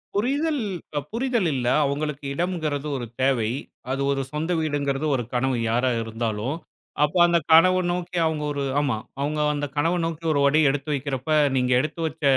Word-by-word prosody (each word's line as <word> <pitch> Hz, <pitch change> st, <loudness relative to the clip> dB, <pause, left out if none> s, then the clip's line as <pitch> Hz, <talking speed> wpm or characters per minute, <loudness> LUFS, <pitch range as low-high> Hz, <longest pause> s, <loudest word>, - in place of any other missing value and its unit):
புரிதல் 280 Hz, +6 st, 0 dB, 0.5 s
புரிதல் 235 Hz, -4 st, 0 dB
இல்ல. 125 Hz, -2 st, -2 dB, 0.2 s
அவங்களுக்கு 145 Hz, +1 st, -2 dB
இடம்கிறது 155 Hz, -4 st, -2 dB
ஒரு 120 Hz, -, -4 dB, 0.2 s
தேவை. 130 Hz, -5 st, +2 dB, 0.4 s
அது 135 Hz, +1 st, -1 dB
ஒரு 135 Hz, -1 st, 0 dB
சொந்த 155 Hz, +4 st, -2 dB
வீடுங்கிறது 145 Hz, -2 st, -1 dB
ஒரு 120 Hz, -, -1 dB
கனவு 130 Hz, 0 st, +1 dB
யாரா 125 Hz, +2 st, +2 dB
இருந்தாலும். 115 Hz, +3 st, -3 dB, 0.5 s
அப்ப 150 Hz, +5 st, 0 dB
அந்த 170 Hz, 0 st, +3 dB
கனவு 185 Hz, +3 st, +6 dB
நோக்கி 180 Hz, 0 st, -3 dB
அவங்க 155 Hz, -2 st, -2 dB
ஒரு 140 Hz, -, -2 dB, 0.2 s
ஆமா, 140 Hz, -6 st, +1 dB, 0.2 s
அவங்க 150 Hz, +2 st, -1 dB, 0.2 s
அந்த 145 Hz, 0 st, -2 dB
கனவு 165 Hz, +5 st, +1 dB
நோக்கி 165 Hz, 0 st, -4 dB
ஒரு 145 Hz, -, +2 dB
அடி 150 Hz, +3 st, +3 dB
எடுத்து 145 Hz, +2 st, -2 dB
வெக்கிறப்ப 135 Hz, 0 st, -3 dB, 0.3 s
நீங்க 125 Hz, -1 st, +1 dB
எடுத்து 155 Hz, +4 st, -3 dB
வச்ச, 155 Hz, -, -9 dB
145 Hz, 160 wpm, -24 LUFS, 135-170 Hz, 0.5 s, கனவு